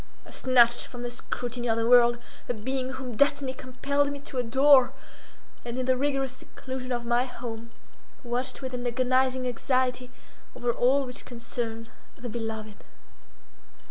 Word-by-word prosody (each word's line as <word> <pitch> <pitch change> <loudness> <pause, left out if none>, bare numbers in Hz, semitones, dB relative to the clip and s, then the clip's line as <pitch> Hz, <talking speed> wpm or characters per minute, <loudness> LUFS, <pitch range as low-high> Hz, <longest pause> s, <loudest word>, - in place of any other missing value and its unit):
I - - -13
snatched 240 -2 +4
from 245 -1 -8
the 240 - -3
scrutiny 245 0 -4
of 225 - +2
the 230 0 +1
world 240 0 +6 0.3
a 245 - 0
being 260 +4 -2
whom 255 -3 -6
destiny 280 +1 +2
compelled 280 +3 -1
me 285 - -5
to 280 -2 -8
adore, 265 +2 +5 0.7
and 240 0 -5
in 255 - -1
the 260 0 +3
rigorous 270 0 0
seclusion 260 -1 -7
of 240 -1 -2
my 240 +1 +2
home, 235 -2 -7 0.5
watched 255 +2 -3
with 260 -1 -4
an 245 0 -2
agonizing 255 +1 +1
anxiety 250 0 0 0.5
over 240 0 0
all 265 +4 +3
which 250 -1 -7
concerned 230 -2 -5 0.3
the 245 - -6
beloved. 220 -2 -5
250 Hz, 150 wpm, -27 LUFS, 240-260 Hz, 0.7 s, world